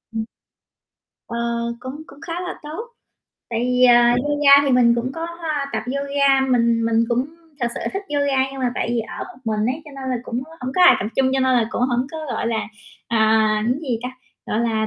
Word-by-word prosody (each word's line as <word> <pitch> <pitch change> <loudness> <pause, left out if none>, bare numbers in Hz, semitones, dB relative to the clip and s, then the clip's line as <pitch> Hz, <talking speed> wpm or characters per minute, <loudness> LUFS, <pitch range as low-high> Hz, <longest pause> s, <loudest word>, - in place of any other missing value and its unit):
Ừm. 220 0 -2 1.0
Ờ, 235 - -4 0.4
cũng 270 +4 -7
cũng 280 +1 -15
khá 330 - -6
là 360 - -6
tốt. 320 +11 -6 0.6
Tại 230 0 -1
vì, 250 +1 +2
ờ, 245 -1 +7 0.3
yoga 290 -1 +3 0.2
thì - - +2
mình 235 -1 +5
cũng 245 +3 -2
có 330 +2 -4 0.5
tập 220 0 -2
yoga. 280 0 +2
Mình 235 -2 +2
mình 230 0 +2
cũng 245 +3 0 0.3
thực 240 - +1
sự - - -5
thích 390 +1 -3
yoga, 280 -2 +1
nhưng 270 - -7
mà 245 -1 0
tại - - -2
vì 240 -1 0
ở 225 - -6
một 245 - -13
mình 215 0 0
ấy, 315 - -11
cho 300 - -12
nên 260 -1 -3
là 250 - 0
cũng 245 0 -4 0.2
hổng 255 +1 -4
có 365 - +3
ai 355 - +8
tập 200 - -3
chung, 260 -1 +3
cho 265 - +1
nên 260 -1 +3
là 225 -2 +2
cũng - - -2
hổng 250 0 +1
có, 320 - -7
gọi 240 - -3
là, 225 -2 0 0.5
à, 220 -1 +3
cái 250 +4 +1
gì 245 -6 -2
ta, 250 - -3 0.4
gọi 220 - -1
là, 220 -2 0
250 Hz, 220 wpm, -21 LUFS, 230-275 Hz, 1.0 s, ai